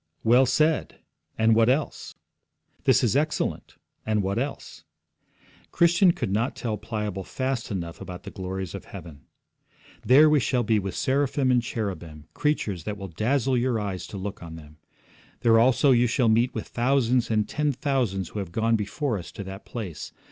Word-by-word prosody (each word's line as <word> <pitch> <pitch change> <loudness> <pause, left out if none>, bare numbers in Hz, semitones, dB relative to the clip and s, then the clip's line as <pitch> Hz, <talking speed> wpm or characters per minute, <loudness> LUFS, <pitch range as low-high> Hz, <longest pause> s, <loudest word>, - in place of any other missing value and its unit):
'Well 125 +3 +5
said; 155 +4 +1 0.4
and 110 0 +4
what 115 +1 +4
else? 145 +4 -1 0.7
This - - +4
is - - +2
excellent; - - -1 0.3
and 105 -2 0
what 100 +4 -1
else?' 135 - -5 0.9
Christian 175 +2 +4
could 100 - -3
not 115 +6 0
tell 110 -3 -3
Pliable 105 -2 -4
fast 130 +2 -3
enough 85 -5 -5
about 90 -1 -8
the 100 - -8
glories 95 -2 -5
of - - -7
heaven. 75 -4 -11 0.8
'There 145 +5 +7
we 150 -1 +4
shall 125 -1 0
be 110 -1 +2
with 95 -1 -5
seraphim 135 0 +1
and 125 -1 +3
cherubim, 90 -10 -5
creatures 105 - -1
that 105 -1 -4
will 100 -1 -7
dazzle 125 - 0
your 120 -1 +1
eyes 100 -3 -4
to 100 - -8
look 95 +1 -6
on 85 -1 -8
them. 75 -2 -13 0.6
There 115 -1 +5
also 130 +4 +4
you 120 -1 +4
shall 120 -1 +2
meet 115 +3 +2
with - - -4
thousands 125 -1 +1
and 110 -2 +1
ten 150 0 0
thousands 125 - -1
who 105 - -5
have 95 -4 -5
gone 115 +4 +1
before 110 +3 -2
us 85 - -10
to 100 - -6
that 95 +1 -9
place. 95 -10 -6
115 Hz, 175 wpm, -25 LUFS, 95-130 Hz, 0.9 s, There